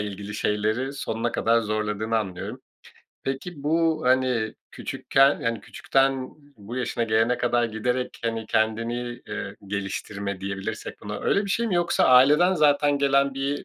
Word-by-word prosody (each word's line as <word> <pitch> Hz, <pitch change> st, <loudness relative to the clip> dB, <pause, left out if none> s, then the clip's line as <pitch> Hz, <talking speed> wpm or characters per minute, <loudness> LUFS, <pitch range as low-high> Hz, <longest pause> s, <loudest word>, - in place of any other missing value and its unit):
ilgili 105 Hz, 0 st, -5 dB
şeyleri 110 Hz, +6 st, 0 dB
sonuna 120 Hz, -4 st, -3 dB
kadar 115 Hz, +1 st, +2 dB
zorladığını 110 Hz, +1 st, -1 dB
anlıyorum. 95 Hz, -4 st, -5 dB, 0.6 s
Peki, 140 Hz, +3 st, -5 dB
bu, 160 Hz, +1 st, +1 dB
hani, 125 Hz, -4 st, +2 dB, 0.2 s
küçükken, 135 Hz, +1 st, +2 dB
hani, 115 Hz, -1 st, -1 dB
küçükten 135 Hz, -1 st, 0 dB, 0.3 s
bu 105 Hz, +4 st, -8 dB
yaşına 120 Hz, -2 st, -1 dB
gelene 115 Hz, +2 st, +2 dB
kadar 120 Hz, 0 st, +2 dB
giderek, 125 Hz, +3 st, -2 dB
hani, 115 Hz, -1 st, -2 dB
kendini, 115 Hz, +3 st, -1 dB
eee, -, -, -5 dB
geliştirme 100 Hz, 0 st, -4 dB
diyebilirsek 100 Hz, +2 st, -5 dB
buna, 105 Hz, 0 st, -6 dB
öyle 200 Hz, -, +1 dB
bir 200 Hz, -, -4 dB
şey 235 Hz, +4 st, +1 dB
mi 185 Hz, -, 0 dB
yoksa 175 Hz, 0 st, +2 dB
aileden 150 Hz, +9 st, +6 dB
zaten 145 Hz, -2 st, +3 dB
gelen 140 Hz, 0 st, +2 dB
bir 140 Hz, +1 st, -2 dB
120 Hz, 140 wpm, -25 LUFS, 110-140 Hz, 0.6 s, aileden